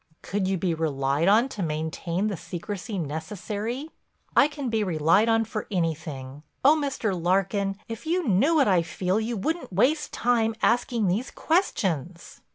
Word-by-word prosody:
"Could 195 -1 -1
you 190 0 +1
be 175 -1 0
relied 145 -1 0
on 220 +6 +5
to 210 - -6
maintain 165 +3 -2
the 210 -2 -1
secrecy 195 +5 -6
necessary?" 210 - -4 0.4
"I 285 - +7
can 290 -3 -5
be 225 -2 +1
relied 175 +4 +3
on 225 0 +3
for 215 -1 -5
anything. 155 -6 -3 0.2
Oh, 295 +3 +8
Mr. 275 -8 -1
Larkin, 195 +3 0
if 230 +6 -7
you 350 -1 0
knew 230 - +3
what 285 -4 +4
I 185 -4 +4
feel 180 +4 -1
you 225 +1 -2
wouldn't 320 - -2
waste 285 - +2
time 230 -2 +1
asking 235 -2 +2
these 205 +8 0
questions." 180 - -1
200 Hz, 160 wpm, -26 LUFS, 170-235 Hz, 0.4 s, Oh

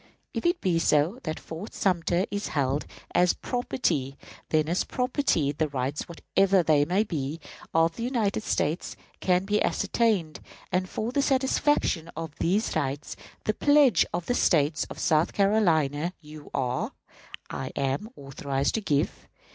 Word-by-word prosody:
If - - 0
it 345 +1 +1
be 175 -3 +2
so, 165 - +2
that 155 -1 -3
Fort 165 +7 -8
Sumter 180 -1 +1
is 205 0 -2
held 140 0 -1 0.3
as 180 0 +4
property, 160 - -2 0.3
then 155 -1 +2
as 175 +3 +1
property, 250 - 0
the 155 +2 -1
rights, 140 +1 -3
whatever 190 +2 +2
they 150 -3 +4
may 185 +6 +2
be, 155 -5 -3 0.3
of 165 0 +2
the 230 - -3
United 225 -6 0
States 160 -5 -1 0.2
can 180 0 +2
be 210 +1 +1
ascertained, 205 -10 +1 0.3
and 185 0 0
for 225 +2 -3
the 280 - +1
satisfaction 265 - +1
of 165 -2 -5
these 200 +6 +1
rights 140 +1 -2 0.3
the 215 - +1
pledge 285 0 +5
of 175 0 -3
the 245 - 0
State 150 -9 +2
of - - -8
South 155 +1 +2
Carolina 170 -6 +2
you 150 -1 -12
are" 125 -2 -1 0.6
(I - - -4
am) 140 +11 -1
"authorized 135 0 -2
to 220 - 0
give. 145 -8 -1
170 Hz, 150 wpm, -27 LUFS, 150-210 Hz, 0.6 s, pledge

